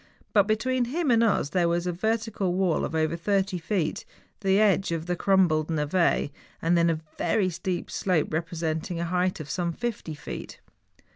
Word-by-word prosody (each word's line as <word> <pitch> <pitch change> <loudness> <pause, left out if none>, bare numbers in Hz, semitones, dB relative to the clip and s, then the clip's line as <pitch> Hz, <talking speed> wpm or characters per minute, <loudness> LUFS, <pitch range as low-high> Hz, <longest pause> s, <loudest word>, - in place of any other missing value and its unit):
But 205 -2 +5
between 245 +3 +1
him 295 +3 0
and 230 -1 +4
us 205 -10 +2
there 175 0 +2
was 170 0 +1
first - - -4
a 175 - -19
vertical 220 -4 0
wall 185 -4 +1
of - - -5
over 160 +1 +1
thirty 195 +1 0
feet, 165 -2 -1 0.4
the 195 -1 +3
edge 195 -4 +3
of 165 -1 -2
the 180 0 -1
crumbled 175 -5 +3
ntve, 160 -1 +1 0.3
then 170 0 +3
a 160 -1 0 0.2
very 190 -4 +1
steep 175 +1 -3
slope 180 -5 0
re¬ 160 +2 0
presenting 165 0 -3
a 170 - -1
height 180 +1 0
of 155 - -6
some 175 +2 -1
fifty 210 -5 -4
feet. 145 - -8
180 Hz, 185 wpm, -26 LUFS, 165-200 Hz, 0.4 s, But